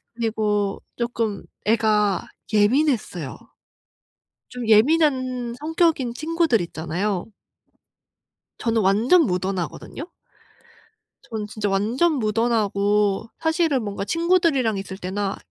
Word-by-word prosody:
그리고 210 -3 -1 0.2
쪼끔 230 -4 -2 0.2
애가 210 -3 +2 0.3
예민했어요. 210 - +1 1.1
좀 245 -2 -6
예민한 255 -1 +3
성격인 310 -6 +1
친구들 320 -6 +1
있잖아요. 175 +4 -3 1.3
저는 230 -1 +1
완전 225 - +4
무던하거든요. 185 - -3 1.2
저는 215 -2 -5
진짜 210 -1 -3
완전 230 +12 +1
무던하고 210 -3 +1
사실은 320 -5 +1
뭔가 200 -1 -4
친구들이랑 330 - +2
있을 190 0 -6
때나 195 +1 -3
220 Hz, 230 characters per minute, -23 LUFS, 200-265 Hz, 1.3 s, 완전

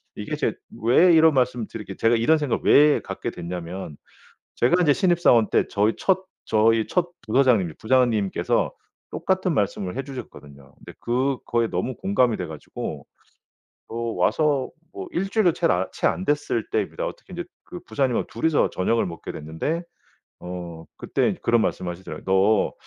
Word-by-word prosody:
이게 - - -4
제 - - -1 0.3
왜 165 +10 +5
이런 160 -1 +6
말씀을 125 -4 0
드리게 105 -3 -8
제가 115 +1 +3
이런 120 +8 +3
생각을 145 -5 -1
왜 150 0 +6
갖게 - - -5
됐냐면 85 -2 -6 0.6
제가 175 +10 +3
이제 150 -4 +4
신입사원 175 - +3
때 - - +2
저의 105 +2 +1
첫 190 -1 +1 0.2
저의 110 0 +3
첫 175 -1 0 0.2
부서장님이 110 - +3
부장님께서 115 -5 +1 0.4
똑같은 185 -2 0
말씀을 100 -4 -1
해 135 - -2
주셨거든요. 75 - -11
근데 - - -13
그거에 120 -1 0
너무 130 +3 -3
공감이 130 - +1
돼 90 - -3
가지고 80 -2 -7 0.8
어 - - -9 0.3
와서 145 -4 +2 0.2
뭐 385 0 -7
1 195 - -2
주일도 200 -4 +3
챌 - - +1
아 90 +1 +1
채 - - 0
안 85 +3 -1
됐을 145 -6 -1
때입니다. - - -2
어떻게 - - -10
인제 175 0 -4 0.2
그 180 - -9
부장님 130 -4 0
2 115 - -4
이서 160 -2 +3
저녁을 115 +5 0
먹게 85 -2 -7
됐는데 80 - -3 0.6
어 85 -2 -7
그때 - - 0
이제 - - -4
그런 115 -1 +3
말씀을 90 -4 -2
하시더라고요. 90 +2 -9
"너 95 +2 +3
120 Hz, 340 characters per minute, -24 LUFS, 95-150 Hz, 0.8 s, 이런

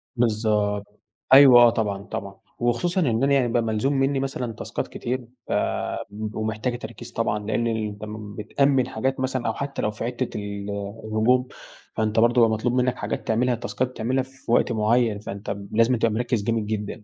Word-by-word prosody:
بالضبط. 105 -3 0 0.3
أيوه 135 -3 +9
آه، 120 - +8
طبعًا، 105 -4 -2
طبعًا. 100 -2 -6 0.2
وخصوصًا 170 +11 +1
إن 120 -4 +1
أنا 140 0 +3
يعني 130 -3 +3
بقى 120 0 +1
ملزوم 115 +5 0
منّي 135 0 +1
مثلًا 130 -3 -3
تاسكات - - -4
كتير 125 0 -4 0.2
ف - - -6 0.6
م 105 +1 -6
ومحتاجة 110 +3 -2
تركيز 120 +1 -9
طبعًا، 115 -2 -1
لإن 115 +2 0
أنت 110 -2 -3
م 105 -1 -8
بتأمِّن 135 +4 +1
حاجات 130 +4 -2
مثلًًا 130 -2 -1
أو 110 - 0
حتّى 140 +3 -4
لو 105 - 0
في 105 - -7
حتّة 125 +1 -2
ال 100 -1 -5 0.4
الهجوم، 120 +4 +2 0.5
فأنت 110 0 +1
برضه 120 +2 +4
يبقى 115 -1 +6
مطلوب 110 +3 0
منّك 125 0 +2
حاجات 105 - -4
تعملها، 120 +2 +2
تاسكات 115 +2 -2
بتعملها 130 +2 -1
في 130 -2 -9
وقت 120 - +3
معيّن، 110 -1 +2
فأنت 100 0 -5 0.2
لازمًا 115 +3 +3
تبقى 115 0 +2
مركّز 120 -1 -1
جامد 115 0 0
جدًا 105 0 -4
115 Hz, 180 wpm, -24 LUFS, 110-125 Hz, 0.6 s, أيوه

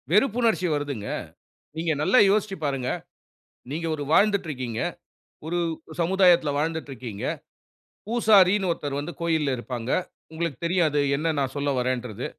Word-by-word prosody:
வெறுப்புணர்ச்சி 220 -2 +3
வருதுங்க. 140 -8 -3 0.7
நீங்க 160 0 0
நல்லா 255 +11 +4
யோசிச்சு 200 -1 +1
பாருங்க. 135 -3 -1 0.8
நீங்க 165 +3 -3
ஒரு 145 - -5
வாழ்ந்துட்டு 200 +1 +3
இருக்கீங்க. 125 -5 -4 0.7
ஒரு 170 +2 -2 0.4
சமுதாயத்துல 175 -3 +4
வாழ்ந்துட்டு 160 -1 -2
இருக்கீங்க. 115 -5 -7 0.8
பூசாரின்னு 205 -4 +4
ஒருத்தர் 145 -4 -3
வந்து 150 +4 -5
கோயில்ல 160 -4 +1
இருப்பாங்க. 120 0 -4 0.4
உங்களுக்குத் 165 -2 -3
தெரியாது 170 -4 +2 0.2
என்ன 160 +2 0
நான் 135 -1 -1
சொல்ல 145 0 0
வர்றேன்றது. 125 -2 -2
160 Hz, 120 wpm, -25 LUFS, 135-185 Hz, 0.8 s, நல்லா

